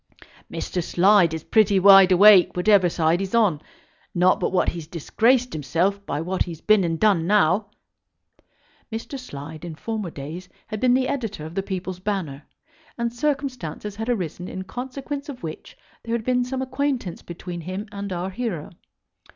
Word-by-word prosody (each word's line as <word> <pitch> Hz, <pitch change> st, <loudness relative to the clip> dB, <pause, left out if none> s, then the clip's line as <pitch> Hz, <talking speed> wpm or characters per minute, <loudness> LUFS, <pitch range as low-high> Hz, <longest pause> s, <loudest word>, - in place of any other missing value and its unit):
"Mr. 180 Hz, -, -3 dB
Slide 185 Hz, 0 st, +4 dB
is 160 Hz, -1 st, -5 dB
pretty 210 Hz, -3 st, +3 dB
wide 195 Hz, 0 st, +8 dB
awake 190 Hz, -1 st, +7 dB
whatever 185 Hz, -1 st, +4 dB
side 165 Hz, 0 st, +1 dB
he's 195 Hz, +3 st, -3 dB
on. 200 Hz, -10 st, +3 dB, 0.5 s
Not 180 Hz, +1 st, +3 dB
but -, -, -1 dB
what 185 Hz, -, +2 dB
he's 165 Hz, -3 st, -7 dB
disgraced 235 Hz, -, +1 dB
himself 170 Hz, +7 st, -1 dB
by 145 Hz, -, -2 dB
what 185 Hz, +3 st, -3 dB
he's 165 Hz, -3 st, -8 dB
been 215 Hz, 0 st, +3 dB
and 165 Hz, -2 st, -1 dB
done 195 Hz, -6 st, +3 dB
now." 205 Hz, 0 st, +3 dB, 1.2 s
Mr. 230 Hz, +5 st, -5 dB
Slide 155 Hz, -, -9 dB
in 170 Hz, -2 st, -6 dB
former 215 Hz, +1 st, -4 dB
days 160 Hz, +5 st, -8 dB, 0.2 s
had 215 Hz, -2 st, -6 dB
been 250 Hz, +1 st, +3 dB
the 260 Hz, 0 st, +1 dB
editor 225 Hz, -, -4 dB
of 160 Hz, -, -8 dB
the 195 Hz, -, -1 dB
People's 185 Hz, -1 st, -5 dB
Banner, 185 Hz, -8 st, -4 dB, 0.5 s
and 235 Hz, 0 st, -2 dB
circumstances 250 Hz, -, -3 dB
had 225 Hz, +2 st, -4 dB
arisen 180 Hz, -5 st, -3 dB
in 190 Hz, -, -6 dB
consequence 270 Hz, +7 st, -6 dB
of 255 Hz, -8 st, -8 dB
which 155 Hz, -1 st, -8 dB, 0.3 s
there 230 Hz, 0 st, -2 dB
had 225 Hz, -2 st, -4 dB
been 250 Hz, -1 st, +2 dB
some 260 Hz, +1 st, -3 dB
acquaintance 260 Hz, -7 st, -2 dB
between 175 Hz, 0 st, -7 dB
him 185 Hz, +5 st, -5 dB
and 200 Hz, -1 st, -6 dB
our 180 Hz, +1 st, -3 dB
hero. 195 Hz, -8 st, -4 dB
195 Hz, 165 wpm, -23 LUFS, 175-230 Hz, 1.2 s, wide